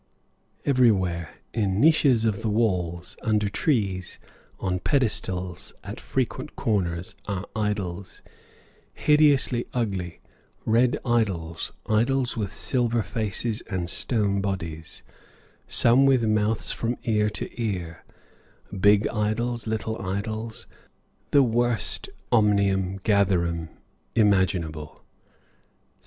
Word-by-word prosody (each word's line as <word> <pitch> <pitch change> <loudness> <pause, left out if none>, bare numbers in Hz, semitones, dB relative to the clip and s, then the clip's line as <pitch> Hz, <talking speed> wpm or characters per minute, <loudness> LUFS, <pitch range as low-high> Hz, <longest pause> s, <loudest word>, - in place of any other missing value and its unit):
Everywhere, 95 - +2 0.2
in 100 -4 0
niches 140 -5 +4
of 105 -3 0
the 110 - -1
walls, 90 -6 -1
under 105 -2 +1
trees, 100 - -1 0.4
on 90 -1 -1
pedestals 95 - -1
at - - -7
frequent 130 +2 -3
corners, 90 -7 -1
are 100 -1 -3
idols, 100 -4 -3 0.7
hideously 145 -5 +3
ugly; 95 -8 -2 0.5
red 120 +3 +3
idols, 95 -9 -1
idols 120 +4 +1
with 105 -4 -3
silver 120 -3 +1
faces 110 +1 -3
and 90 -3 -2
stone 100 -5 0
bodies, 85 -5 -5 0.6
some 125 +4 +4
with 130 -3 +4
mouths 110 0 +1
from 120 +1 -2
ear 105 -2 +2
to 105 - -4
ear, 90 -7 -3 0.7
big 100 +2 +4
idols, 115 +2 -1
little 110 0 -2
idols, 110 +4 -4 0.6
the 140 -1 +5
worst 120 -4 0 0.2
omnium 100 -4 +2
gatherum 85 -6 +1 0.5
imaginable. 90 -8 +1
105 Hz, 95 wpm, -25 LUFS, 95-115 Hz, 0.7 s, the